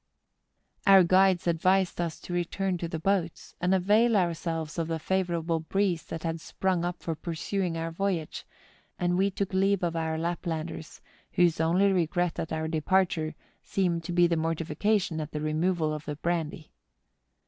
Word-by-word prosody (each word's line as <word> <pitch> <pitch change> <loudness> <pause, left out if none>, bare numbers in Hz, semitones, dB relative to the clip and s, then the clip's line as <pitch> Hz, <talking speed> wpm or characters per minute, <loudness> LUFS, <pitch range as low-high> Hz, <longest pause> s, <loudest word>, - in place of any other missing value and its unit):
Our 195 -1 +8
guides 185 +1 +4
advised 180 +2 +2
us 170 -2 -3
to 175 - -7
return 180 +1 -1
to 170 - -3
the 165 - -4
boats, 175 0 -1
and 180 +1 +1
avail 210 +5 +4
ourselves 165 -2 -2
of 165 - -1
the 165 0 -1
favourable 170 -1 -1
breeze 180 +1 0
that 165 - -6
had 165 -1 -3
sprung 185 -1 -1
up 175 0 -4
for 165 - -1
pursuing 170 +2 -3
our 165 0 -3
voyage, 175 -3 -2 0.5
and 175 0 +1
we 195 +2 +3
took 195 +1 -3
leave 195 0 +2
of 170 -1 0
our 160 -1 -1
Laplanders, 165 -1 -4 0.3
whose 170 -2 +3
only 185 +5 +3
regret 175 -1 0
at 160 - -4
our 160 0 -2
departure 160 0 +1 0.3
seemed 175 -4 -1
to 175 - -4
be 175 0 +4
mortification 165 +2 0
at 150 - -7
the 150 - -2
re¬ 155 0 -2
moval 165 -2 +1
of 150 +1 -8
the 150 - -4
brandy. 160 -1 -3
170 Hz, 165 wpm, -28 LUFS, 160-185 Hz, 0.5 s, Our